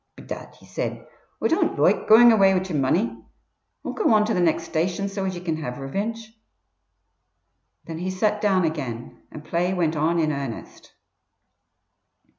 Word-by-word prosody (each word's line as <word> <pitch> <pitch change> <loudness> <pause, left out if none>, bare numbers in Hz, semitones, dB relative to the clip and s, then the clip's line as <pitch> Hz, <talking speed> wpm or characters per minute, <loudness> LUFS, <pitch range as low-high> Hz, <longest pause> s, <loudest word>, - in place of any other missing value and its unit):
"Bedad," - - -9
he - - -19
said, - - -5 0.4
"Oi - - +4
don't - - +1
loike - - +2
goin' 235 +2 +8
away 195 -3 +5
wid 185 +1 -1
yer 175 - -4
money. 115 -4 0 0.6
Oi'll - - -3
go 430 - +1
on 210 0 +4
to 225 - -1
the 185 - 0
next 170 -2 +2
station 180 +5 -1
so 195 -1 -4
as 190 -1 -2
ye 175 - -7
can 165 -3 -2
have 125 -6 -5
revinge." 220 +11 -5 1.5
Then 165 -1 -6
he 180 +2 -3
sat 210 +3 0
down 190 -4 +2
again, 130 -8 -5
and 155 0 -10
play 180 +2 0
went 165 -3 0
on 160 +3 +1
in 155 -2 +1
earnest. 140 -5 -7
175 Hz, 170 wpm, -24 LUFS, 155-200 Hz, 1.5 s, goin